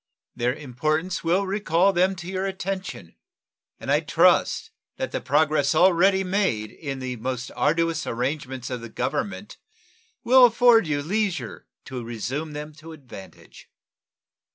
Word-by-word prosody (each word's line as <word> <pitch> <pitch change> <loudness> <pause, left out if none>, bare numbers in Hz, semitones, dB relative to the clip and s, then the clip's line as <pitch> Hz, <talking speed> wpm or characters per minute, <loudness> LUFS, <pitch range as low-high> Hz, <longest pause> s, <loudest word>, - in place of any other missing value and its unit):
Their 125 +2 0
importance 155 +6 -2
will 180 +4 +2
recall 195 -1 +2
them 185 +2 +2
to 175 -1 -9
your 190 +1 -2
attention, 190 - -5 0.7
and - - -3
I - - +4
trust - - +2 0.3
that - - -3
the - - -3
progress 150 0 +2
already 190 +3 +4
made 185 - -1
in 140 -3 -6
the 130 -1 -5
most 125 +2 -4
arduous 165 +1 0
arrangements 130 0 -3
of 125 -2 -4
the 115 - -8
Government 200 - -4 0.7
will 255 +1 +7
afford 235 -4 +5
you 145 -2 -1
leisure 195 +1 -2 0.2
to 130 -3 -6
resume 125 +7 -4
them 150 +1 -7
to 160 +1 -11
advantage. 130 -10 -13
160 Hz, 135 wpm, -24 LUFS, 130-190 Hz, 0.7 s, will